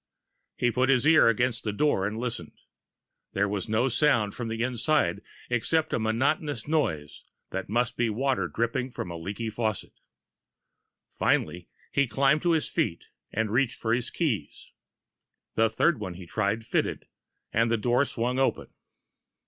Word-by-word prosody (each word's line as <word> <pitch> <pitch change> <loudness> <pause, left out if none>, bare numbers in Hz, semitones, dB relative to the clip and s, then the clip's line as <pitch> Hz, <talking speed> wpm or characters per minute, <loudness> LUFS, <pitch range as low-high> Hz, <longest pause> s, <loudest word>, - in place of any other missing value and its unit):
He 120 - +2
put 130 +3 +1
his 130 -1 +3
ear 160 -4 +6
against 120 +1 +1
the 105 - -1
door 105 -4 +1
and 105 +2 -4
listened. 120 0 -4 0.8
There 100 +1 +1
was 100 +1 -3
no 110 +4 +2
sound 120 -5 +2
from 120 -2 -5
inside 115 - 0 0.3
except 155 +6 0
a - - +1
monotonous 130 +4 0
noise 110 - -1 0.3
that 95 0 -4
must 120 +3 0
be 120 -1 +2
water 130 +5 0
dripping 120 +3 -1
from 90 -7 -6
a - - -5
leaky 100 +7 -4
faucet. 110 -2 -2 1.2
Finally, 90 0 0 0.2
he 140 -1 +2
climbed 135 +5 +2
to 175 -1 +2
his 160 - +1
feet 150 - -1 0.3
and 110 -1 -1
reached 125 +1 +1
for 115 0 0
his 120 0 -1
keys. 120 - -3 0.8
The 115 0 +3
third 140 +5 +2
one 95 -4 -5
he 90 0 -9
tried 105 +4 -1
fitted, - - -1 0.5
and 115 +1 +3
the 115 - +2
door 120 +5 +2
swung 125 -1 -2
open. 135 - 0
115 Hz, 155 wpm, -27 LUFS, 105-135 Hz, 1.2 s, ear